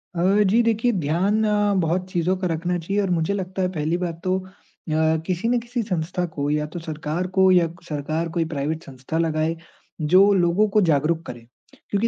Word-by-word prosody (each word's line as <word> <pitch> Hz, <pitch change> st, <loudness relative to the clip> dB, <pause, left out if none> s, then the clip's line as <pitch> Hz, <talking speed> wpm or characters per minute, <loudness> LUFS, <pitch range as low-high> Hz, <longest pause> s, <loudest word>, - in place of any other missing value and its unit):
अ, 170 Hz, -, -1 dB, 0.2 s
जी 215 Hz, +5 st, +3 dB
देखिए, 230 Hz, +1 st, +2 dB
ध्यान 190 Hz, +4 st, +1 dB
अ, 205 Hz, -1 st, +2 dB
बहुत 180 Hz, +3 st, -1 dB
चीज़ों 175 Hz, +2 st, +1 dB
का 185 Hz, -, -1 dB
रखना 175 Hz, +2 st, -1 dB
चाहिए 195 Hz, +5 st, -2 dB
और 195 Hz, -, -1 dB
मुझे 170 Hz, +2 st, 0 dB
लगता 190 Hz, -1 st, -3 dB
है 185 Hz, -, +2 dB
पहली 160 Hz, 0 st, -1 dB
बात 170 Hz, -2 st, -4 dB
तो 185 Hz, 0 st, +1 dB
अ, 185 Hz, -, -12 dB, 0.8 s
किसी 185 Hz, +5 st, -1 dB
न 245 Hz, -1 st, +2 dB
किसी 240 Hz, +1 st, -3 dB
संस्था 180 Hz, -2 st, -2 dB
को 145 Hz, 0 st, -2 dB
या 150 Hz, 0 st, 0 dB
तो 175 Hz, -, -4 dB
सरकार 160 Hz, +2 st, -3 dB
को 190 Hz, 0 st, +6 dB
या 175 Hz, -2 st, +4 dB
क 170 Hz, +2 st, -15 dB
सरकार 155 Hz, +3 st, -2 dB
कोई 165 Hz, -, +2 dB
प्राइवेट 155 Hz, +1 st, -3 dB
संस्था 135 Hz, +4 st, -6 dB
लगाए, 160 Hz, 0 st, 0 dB, 0.5 s
जो 185 Hz, +6 st, +5 dB
लोगों 180 Hz, +3 st, +3 dB
को 210 Hz, +1 st, +3 dB
जागरूक 160 Hz, +3 st, +1 dB
करे। 120 Hz, -, -7 dB, 0.5 s
क्योंकि 205 Hz, +3 st, +1 dB
175 Hz, 200 wpm, -23 LUFS, 160-195 Hz, 0.8 s, को